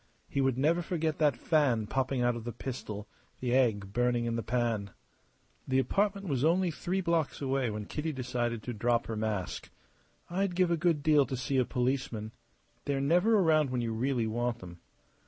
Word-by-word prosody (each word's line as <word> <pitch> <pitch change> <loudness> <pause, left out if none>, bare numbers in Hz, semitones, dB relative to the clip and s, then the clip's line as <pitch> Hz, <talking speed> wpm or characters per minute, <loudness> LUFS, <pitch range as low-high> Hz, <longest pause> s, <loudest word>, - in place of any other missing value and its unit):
He 140 - -1
would 135 -2 +1
never 160 +6 +2
forget 160 -3 -2
that 145 -6 +3
fan 130 -7 +2
popping 130 +2 0
out 120 0 +2
of 115 - -6
the 120 - -4
pistol, 110 -4 -6 0.3
the 125 -1 -1
egg 105 -7 +2
burning 120 0 +1
in 115 0 -1
the 115 - -1
pan. 115 -4 -1 0.8
The 130 - +1
apartment 200 +7 +1
was 135 -4 0
only 175 +3 +3
three 185 +4 -2
blocks 170 -4 0
away 135 -3 0
when 105 -1 -4
Kitty 155 +8 -3
decided 120 -4 -2
to 125 - -4
drop 120 +2 +1
her 115 - -4
mask. 105 -4 -3 0.6
"I'd 185 +1 -1
give 180 -1 +3
a - - +4
good 165 -3 +1
deal 150 -3 +4
to 130 - -3
see 130 +2 0
a 125 - +3
policeman. 125 -4 -2 0.5
They 140 - 0
are - - 0
never 175 +11 +3
around 155 -6 +3
when 125 -1 -1
you 115 -1 -2
really 120 +1 0
want 120 +2 -1
them. 90 -4 -11
130 Hz, 190 wpm, -30 LUFS, 115-155 Hz, 0.8 s, a